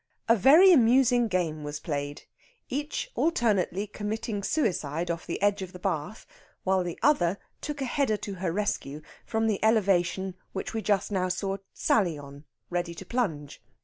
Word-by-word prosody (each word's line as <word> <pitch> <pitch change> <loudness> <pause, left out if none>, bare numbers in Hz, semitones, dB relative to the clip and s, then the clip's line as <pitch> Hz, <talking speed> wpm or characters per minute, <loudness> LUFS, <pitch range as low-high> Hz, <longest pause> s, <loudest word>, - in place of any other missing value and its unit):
A 230 - +6
very 305 - +7
amusing 245 -2 +4
game 170 -6 -1
was 145 0 -5
played, 145 -2 -4 0.5
each 295 - -3
alternately 210 - +1
committing 210 +1 -4
suicide 175 - -1
off 170 -1 -5
the 170 - -3
edge 205 0 +2
of 185 -1 -7
the - - -8
bath 180 +2 -3 0.4
while 190 -1 +2
the 175 -1 -5
other 195 - +3 0.2
took 290 -1 -5
a - - 0
header 255 -4 +1
to 205 - -6
her 180 -3 0
rescue 160 -7 -2 0.2
from 225 0 0
the 215 -2 0
elevation 195 -4 +2 0.2
which 190 - -4
we 225 - -2
just 205 -1 0
now 185 -2 0
saw 195 +2 -2 0.2
Sally 175 -8 +2
on 140 +1 -11 0.3
ready 175 -1 -2
to 190 - -9
plunge. 165 - -3
195 Hz, 165 wpm, -27 LUFS, 170-225 Hz, 0.5 s, very